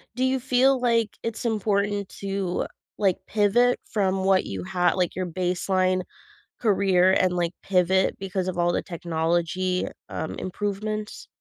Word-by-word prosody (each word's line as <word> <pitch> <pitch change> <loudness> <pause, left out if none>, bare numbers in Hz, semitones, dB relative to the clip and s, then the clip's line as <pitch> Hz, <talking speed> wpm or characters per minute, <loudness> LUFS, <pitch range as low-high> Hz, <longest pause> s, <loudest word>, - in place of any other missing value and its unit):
Do 255 - 0
you 260 0 +2
feel 260 +1 +3
like 230 -3 +1
it's 230 0 -4
important 205 -2 0
to, 195 -2 -2 0.3
like, 195 -4 +2
pivot 220 +4 +3
from 190 -2 0
what 190 0 +3
you 95 -2 -5
ha 175 - +1
like, 180 -2 0
your 185 - -2
baseline 185 +1 0 0.6
career 190 -4 +3
and, 185 -1 +3
like, 175 -1 0
pivot 190 0 +2
because 190 -1 -3
of 185 -1 -3
all 175 0 +2
the - - 0
technology, 170 +2 -1 0.2
um, 160 - -4
improvements? 210 +2 -4
190 Hz, 140 wpm, -25 LUFS, 180-210 Hz, 0.6 s, feel